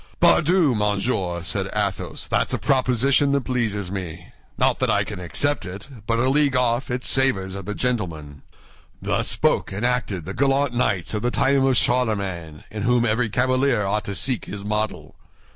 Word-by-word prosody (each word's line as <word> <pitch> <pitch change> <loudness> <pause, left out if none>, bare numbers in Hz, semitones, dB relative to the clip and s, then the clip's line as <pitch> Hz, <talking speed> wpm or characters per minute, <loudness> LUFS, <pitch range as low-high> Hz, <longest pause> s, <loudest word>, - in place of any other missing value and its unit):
"Pardieu, 165 -3 +4
monsieur!" 100 -4 -1
said - - -3
Athos, - - -2
"that's - - 0
a - - -2
proposition 135 +2 +2
that 140 - +2
pleases 110 -7 -2
me; 90 -3 -6 0.3
not - - +2
that - - +1
I - - +2
can - - -7
accept 145 - 0
it, 95 +4 -8 0.2
but 115 - +1
a 125 +2 +2
league 140 0 +2
off 125 +1 +1
it 125 0 -3
savors 100 -9 0
of 100 -1 -7
the 105 - -4
gentleman. 80 - -3 0.6
Thus - - -1
spoke - - +1
and 100 +5 -2
acted 120 -9 -1
the 95 - -5
gallant 135 +1 +1
knights 105 -7 0
of 105 - -1
the 120 - +1
time 135 +2 +2
of 130 -2 +3
Charlemagne, 100 -10 -1
in 105 0 -5
whom 120 +1 +2
every 115 +1 +1
cavalier 130 -1 +1
ought 105 +2 -1
to 100 - -4
seek 130 +1 -1
his 100 0 -7
model. 105 +1 -3
115 Hz, 175 wpm, -23 LUFS, 95-130 Hz, 0.6 s, Pardieu